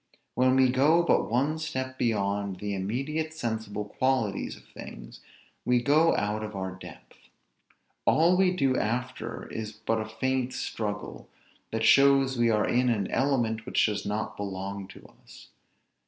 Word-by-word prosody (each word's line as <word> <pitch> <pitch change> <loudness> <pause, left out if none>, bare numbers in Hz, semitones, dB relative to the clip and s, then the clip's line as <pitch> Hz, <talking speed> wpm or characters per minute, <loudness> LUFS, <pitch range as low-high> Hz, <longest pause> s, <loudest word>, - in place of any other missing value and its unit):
When 130 +1 +3
we 130 -1 +5
go 145 +7 +4
but - - +2
one 140 +7 +1
step 130 -4 -4
beyond 100 -3 0
the 100 +2 -4
immediate 135 +11 -3
sensible 110 -6 -3
qualities 115 -2 -1
of - - -18
things, - - -11 0.4
we 125 0 +3
go 150 +6 +4
out 105 +1 -1
of 105 -1 -6
our 95 -1 -4
depth. 95 - -14 0.8
All 170 +3 +4
we 190 0 +4
do 140 -8 +1
after 120 0 -3
is 110 -1 -5
but 110 +1 -2
a 110 - -6
faint 130 +2 -1
struggle, 105 -2 -5 0.4
that 110 0 -2
shows 135 0 +5
we 120 -1 +2
are 105 -2 +2
in 125 +1 +2
an 105 -5 -1
element 120 -5 0
which - - +3
does 105 -2 -1
not 105 +2 -3
belong 100 0 -5
to - - -14 0.2
us. - - -15
120 Hz, 155 wpm, -28 LUFS, 105-135 Hz, 0.8 s, we